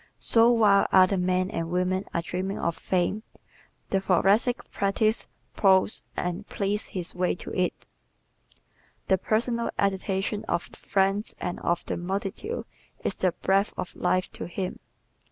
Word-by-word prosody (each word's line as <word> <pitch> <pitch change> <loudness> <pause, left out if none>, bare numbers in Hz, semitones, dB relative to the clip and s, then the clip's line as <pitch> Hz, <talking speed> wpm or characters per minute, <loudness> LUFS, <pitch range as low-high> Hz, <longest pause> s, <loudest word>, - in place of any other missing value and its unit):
So 230 0 +5
while 210 -4 +5
other 190 0 +5
men 185 +1 +1
and 165 -5 -3
women 185 +2 0
are 170 - -1
dreaming 185 +3 -3
of 170 -1 -1
fame 185 +3 0 0.7
the 195 - +2
Thoracic 200 +7 +2
practises, 215 +3 +1 0.3
ploughs 190 +1 +3 0.2
and 180 +4 -3
pleads 205 +1 -2
his 180 -2 -5
way 180 0 0
to - - -8
it. 180 -1 -1 1.2
The 190 -1 +4
personal 235 +3 0
adulation 195 +1 0
of 175 - 0
friends 195 +2 0
and 175 - -3
of 170 0 -1
the - - -2
multitude 195 - -3 0.4
is - - +1
the 185 -1 +1
breath 195 +4 +1
of 180 - -5
life 185 0 0
to - - -6
him. 180 +1 -4
190 Hz, 140 wpm, -27 LUFS, 180-205 Hz, 1.2 s, So